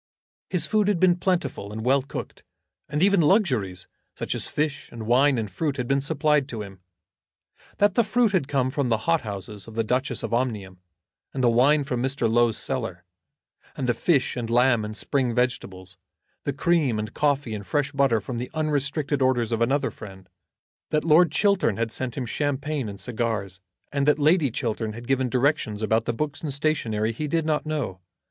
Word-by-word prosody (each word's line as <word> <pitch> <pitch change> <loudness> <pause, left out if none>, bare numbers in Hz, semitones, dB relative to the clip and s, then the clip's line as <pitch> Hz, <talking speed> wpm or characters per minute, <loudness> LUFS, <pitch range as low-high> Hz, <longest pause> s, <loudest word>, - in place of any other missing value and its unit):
His 180 -3 +1
food 215 -2 +1
had 205 -4 +2
been 180 -1 +4
plentiful 170 - -1
and 110 +1 -5
well 135 +2 +4
cooked, 135 - -7 0.5
and 150 +2 0
even 200 -2 +4
luxuries, 125 - +1 0.3
such - - -3
as - - -4
fish 150 -1 -2
and 115 -2 -7
wine 130 +4 +4
and 110 -2 -2
fruit, 140 - -2
had 125 -2 -2
been 135 +1 +2
supplied 150 -1 +1
to 110 -3 -4
him. 95 -2 -11 1.0
That 205 -1 +3
the 235 - +3
fruit 230 +1 +2
had 185 -9 +1
come 130 -2 0
from 140 -2 -1
the 110 -1 0
hot 165 -1 +2
houses 100 -1 -7
of 110 - -11
the 115 - +1
Duchess 125 +1 -1
of 115 0 -3
Omnium, 105 -7 -2 0.6
and 130 - -1
the 120 - +5
wine 140 +5 +4
from 125 -3 -2
Mr. 130 -2 0
Low's 115 0 +3
cellar, - - -2 0.7
and 130 - -3
the 120 - +3
fish 140 0 +1
and 120 -2 -4
lamb 120 -1 +3
and 105 0 -5
spring 130 -5 -1
vegetables, 95 -7 -2 0.5
the 140 - -1
cream 150 -5 +1
and 105 +1 -4
coffee 145 -5 0
and 105 -1 -5
fresh 145 +6 -1
butter 135 -5 +2
from 120 +3 -5
the 125 - -4
unrestricted 145 -1 -1
orders 125 -3 +2
of 115 0 -1
another 135 +5 +1
friend, 95 -3 -11 0.6
that 150 0 0
Lord 165 0 +5
Chiltern 195 - +2
had 115 -1 -1
sent 125 -1 -3
him 130 - -2
champagne 145 0 -2
and 100 -1 -8
cigars, 110 -4 -3 0.3
and 140 0 0
that 150 - +5
Lady 155 0 +3
Chiltern 110 -2 -3
had 120 +2 -9
given 130 -1 +1
directions 125 -5 0
about 110 +1 +1
the - - 0
books 145 +4 -3
and 150 - -3
stationery, 120 -7 0
he 150 +7 -4
did 165 +1 0
not 155 -1 0
know. 140 -12 -3
130 Hz, 195 wpm, -25 LUFS, 115-150 Hz, 1.0 s, the